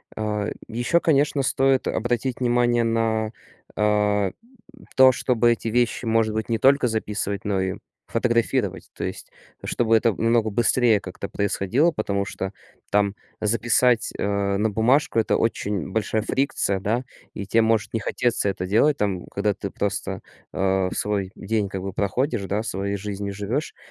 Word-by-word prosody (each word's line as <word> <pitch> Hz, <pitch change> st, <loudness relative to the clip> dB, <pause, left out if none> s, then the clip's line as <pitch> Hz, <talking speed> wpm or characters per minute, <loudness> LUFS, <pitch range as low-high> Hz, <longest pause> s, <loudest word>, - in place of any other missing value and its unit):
А, 105 Hz, -1 st, -2 dB, 0.2 s
еще, 120 Hz, +9 st, +1 dB
конечно, 145 Hz, -3 st, +2 dB
стоит 135 Hz, 0 st, +2 dB
обратить 120 Hz, +2 st, -1 dB
внимание 120 Hz, -1 st, +2 dB
на, 115 Hz, -1 st, 0 dB, 0.4 s
э, 105 Hz, -2 st, +2 dB, 0.6 s
то, 130 Hz, 0 st, +8 dB
чтобы 120 Hz, -2 st, +2 dB
эти 115 Hz, -, -2 dB
вещи, 120 Hz, +2 st, 0 dB
может 110 Hz, -1 st, +2 dB
быть, 110 Hz, +1 st, -3 dB
не 115 Hz, -, +1 dB
только 135 Hz, +1 st, +4 dB
записывать, 105 Hz, -2 st, -2 dB
но 100 Hz, -2 st, 0 dB
и 95 Hz, 0 st, -1 dB, 0.3 s
фотографировать. 115 Hz, 0 st, 0 dB
То -, -, -4 dB
есть -, -, -6 dB, 0.3 s
чтобы 115 Hz, -1 st, +1 dB
это 115 Hz, +1 st, +3 dB
намного 115 Hz, -1 st, +2 dB
быстрее 120 Hz, 0 st, +3 dB
как-то 95 Hz, +1 st, -7 dB
происходило, 100 Hz, -, +1 dB
потому 100 Hz, -6 st, -2 dB
что 95 Hz, 0 st, -5 dB, 0.4 s
там 100 Hz, -1 st, +2 dB, 0.3 s
записать, 115 Hz, +2 st, +2 dB
э, 100 Hz, -1 st, 0 dB
на 110 Hz, +2 st, +1 dB
бумажку- 115 Hz, +4 st, +2 dB
это 110 Hz, -, +2 dB
очень 105 Hz, -5 st, -1 dB
большая 110 Hz, +1 st, -1 dB
фрикция, 110 Hz, -7 st, 0 dB
да. 110 Hz, +5 st, -1 dB, 0.3 s
И 100 Hz, -, -5 dB
те 115 Hz, +3 st, +3 dB
может 110 Hz, -2 st, +1 dB
не 115 Hz, -, 0 dB
хотеться 115 Hz, -1 st, 0 dB
это 90 Hz, -1 st, -3 dB
делать 115 Hz, +10 st, +3 dB
там, 95 Hz, -4 st, -1 dB
когда 100 Hz, +1 st, -1 dB
ты 100 Hz, 0 st, -6 dB
просто, 100 Hz, +1 st, -3 dB, 0.3 s
э, 95 Hz, -1 st, +1 dB
свой 100 Hz, -2 st, -1 dB
день 105 Hz, -1 st, -1 dB
как 95 Hz, -1 st, -5 dB
бы 95 Hz, -1 st, -5 dB
проходишь, 115 Hz, +3 st, -1 dB
да, 100 Hz, +3 st, -1 dB
своей 100 Hz, -1 st, -2 dB
жизнью 100 Hz, 0 st, -4 dB
живёшь. 105 Hz, +10 st, -3 dB
110 Hz, 155 wpm, -23 LUFS, 100-120 Hz, 0.6 s, то